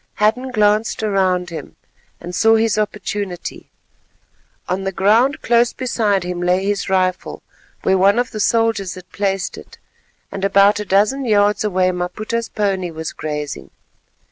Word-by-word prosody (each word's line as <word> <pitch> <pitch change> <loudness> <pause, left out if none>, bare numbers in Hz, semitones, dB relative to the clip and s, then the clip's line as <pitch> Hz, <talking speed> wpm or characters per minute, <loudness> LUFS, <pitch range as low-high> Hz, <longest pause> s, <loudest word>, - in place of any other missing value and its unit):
Hadden 230 +5 +1
glanced 215 -1 +1
around 185 -4 +1
him, 155 -4 -8 0.4
and 175 +1 -8
saw 225 +5 +4
his 225 -1 +2
opportunity. 205 -3 -4 1.0
On 185 +2 -2
the 195 - -2
ground 220 - +2
close 235 0 +3
beside 220 -7 0
him 180 0 -4
lay 180 +2 +1
his 200 -1 -1
rifle, 185 -1 -1 0.4
where 190 0 +2
one 200 +3 +4
of 245 0 0
the 215 - -6
soldiers 225 -3 +1
had 185 -1 -13
placed 195 -2 -2
it, - - -15 0.5
and 195 - -6
about 200 +1 +4
a 210 - -4
dozen 210 +8 +2
yards 205 -2 +2
away 185 -3 +1
Maputa's 215 +6 -3
pony 195 -4 -1
was 160 -1 -6
grazing. 150 -2 -5
200 Hz, 145 wpm, -19 LUFS, 185-215 Hz, 1.0 s, saw